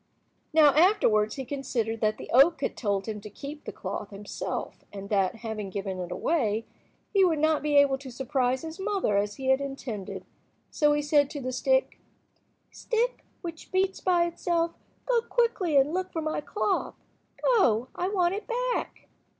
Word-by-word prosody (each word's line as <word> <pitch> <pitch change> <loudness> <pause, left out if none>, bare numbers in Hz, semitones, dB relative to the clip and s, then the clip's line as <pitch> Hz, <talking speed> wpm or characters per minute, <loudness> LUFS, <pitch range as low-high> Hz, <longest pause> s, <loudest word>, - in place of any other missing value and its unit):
Now 305 -3 +6
afterwards 295 - +4
he 265 -2 -5
considered 240 -5 -2
that 215 -1 +1
the - - -9
oak 275 +5 +6
had - - -1
told 200 -4 -1
him 215 -2 -5
to 210 - -9
keep 285 +8 -9
the - - -4
cloth 200 +2 -5
himself, 205 0 -5
and 200 -1 -8
that, 195 -2 +1
having 215 -3 -4
given 190 -1 -4
it 180 -1 -5
away, 225 - 0 0.5
he 395 -2 +5
would 340 -4 +3
not 310 0 +2
be 295 0 0
able 280 -1 +5
to 270 -1 -9
surprise 255 +1 -1
his 325 +3 -7
mother 385 - 0
as 205 +1 0
he 265 -1 -3
had 265 +1 +4
intended. 265 -8 -6 0.5
So 295 -2 +3
he 295 0 0
said 290 -1 +3
to 290 - -6
the 255 -1 -3
stick— - - +1 0.7
"Stick 480 +1 -1 0.2
which 335 -2 -8
beats 380 0 +1
by 350 -2 +3
itself, 340 0 0 0.3
go 485 -2 +2
quickly 455 - +1
and 275 +3 +3
look 370 0 -2
for 325 - -3
my 310 -1 -2
cloth. 400 +4 -1 0.5
Go, 255 - +3
I 360 - -2
want 365 -3 +1
it 415 - -5 0.3
back." - - -5
285 Hz, 175 wpm, -27 LUFS, 220-345 Hz, 0.7 s, Now